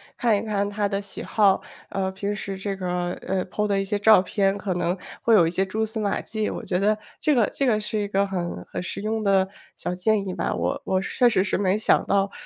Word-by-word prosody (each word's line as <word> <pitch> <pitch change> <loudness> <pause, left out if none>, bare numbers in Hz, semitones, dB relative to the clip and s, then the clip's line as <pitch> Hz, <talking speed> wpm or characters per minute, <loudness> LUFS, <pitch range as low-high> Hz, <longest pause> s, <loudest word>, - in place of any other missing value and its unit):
看 230 -4 +2
一 - - -2
看 205 -2 -1
他 205 0 0
的 200 0 -2
喜 200 - -6
好， 200 -3 +3 0.3
呃， 190 -1 -1
平 200 +2 -2
时 200 -2 -5
这 195 0 -3
个， 180 -1 -2 0.2
呃， 190 -1 0
po 210 +3 -1
的 200 -1 +1
一 195 - 0
些 205 +1 -1
照 215 -2 +7
片 195 +1 0
可 195 -1 -2
能 175 +1 0 0.2
会 230 - +3
有 175 -5 +6
一 165 - 0
些 190 +2 +1
蛛 220 +3 -1
丝 220 +1 -4
马 205 -2 0
迹， 215 -1 -3
我 - - -5
觉 180 - -1
得 210 +2 +2 0.2
这 300 - +2
个 235 -4 +4
这 275 - -1
个 220 -4 +3
是 215 0 -2
一 205 - -1
个 200 0 +1
很 180 -3 -4
很 - - -3
实 190 - -5
用 220 +1 -1
的 195 -2 +3 0.3
小 - - -4
建 200 +3 +1
议 185 - -3
吧。 - - -2
我 - - -1
我 185 0 +1
确 245 +5 +2
实 190 -5 +2
是 195 - -1
没 195 +1 +2
想 215 - +3
到。 195 0 +1
200 Hz, 275 characters per minute, -24 LUFS, 190-215 Hz, 0.3 s, 照